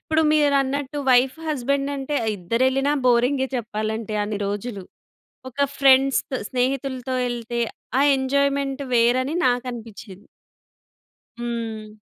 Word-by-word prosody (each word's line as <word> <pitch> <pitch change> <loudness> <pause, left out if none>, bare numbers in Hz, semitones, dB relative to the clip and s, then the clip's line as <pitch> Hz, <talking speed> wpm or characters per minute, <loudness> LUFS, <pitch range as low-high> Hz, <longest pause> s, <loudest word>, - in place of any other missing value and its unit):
ఇప్పుడు 320 0 +3
మీరన్నట్టు 285 -1 +1
wife 255 +2 +4
husband 280 0 -1
అంటే 275 +2 -3 0.2
ఇద్దరెళ్ళినా 260 +9 +1
బోరిం‌గే 250 +3 +3
చెప్పాలంటే 215 -1 -3
అన్ని 205 0 -3
రోజులు. 205 0 -4 0.7
ఒక 280 +3 0
ఫ్రెండ్స్‌తొ, 270 -1 +4
స్నేహితులతో 260 0 -1
ఎళ్తే 240 0 -4 0.4
ఆ - - +4 0.2
ఎంజాయ్మెంట్ 280 +1 0
వేరని 255 +5 +2
నాకనిపించింది. 235 -5 -5 1.1
హ్మ్. 225 -3 -5
255 Hz, 95 wpm, -23 LUFS, 230-275 Hz, 1.1 s, wife